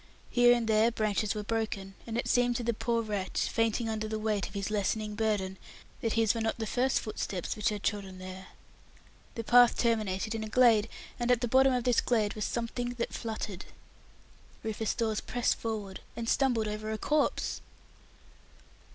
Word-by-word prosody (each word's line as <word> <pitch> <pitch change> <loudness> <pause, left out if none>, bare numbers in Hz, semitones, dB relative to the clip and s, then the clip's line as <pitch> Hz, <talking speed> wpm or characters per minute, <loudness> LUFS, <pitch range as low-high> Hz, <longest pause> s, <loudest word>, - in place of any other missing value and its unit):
Here 245 0 +6
and 235 -2 -1
there 220 +1 +4
branches 215 -2 0
were 210 - -3
broken, 210 -3 -3
and 230 0 -3
it 240 - -1
seemed 245 0 +3
to 240 - -2
the 235 0 +1
poor 230 +1 0
wretch, 205 -3 -2
fainting 225 0 0
under 215 -1 -2
the 220 0 -2
weight 215 -4 -1
of - - -13
his 200 +1 -2
lessening 210 +1 -1
burden, 205 -3 -1 0.4
that 225 - 0
his 225 -2 +3
were 230 - -3
not 225 0 -1
the 225 - -3
first 255 +3 +1
footsteps 195 -4 -4
which 215 +2 +1
had 210 -2 -4
trodden 195 -3 -2
there. 185 0 -8 0.9
The 230 - -3
path 245 +1 +6
terminated 215 -2 0
in 220 -1 -3
a 215 - -5
glade, 230 -2 +5 0.3
and 240 0 -1
at 245 -2 +4
the 245 - 0
bottom 265 +3 +5
of 250 -1 0
this 245 -1 +3
glade 220 -4 +1
was 215 - -3
something 245 +1 -3
that 235 - -3
fluttered. 215 -5 -5 1.0
Rufus 220 0 -2
Dawes 220 -3 0
pressed 245 -1 0
forward, 210 -4 -4 0.2
and 230 -1 -4
stumbled 240 -4 +2
over 215 +1 -4
a 220 - -2
corpse! 300 +5 0
220 Hz, 185 wpm, -30 LUFS, 210-235 Hz, 1.0 s, Here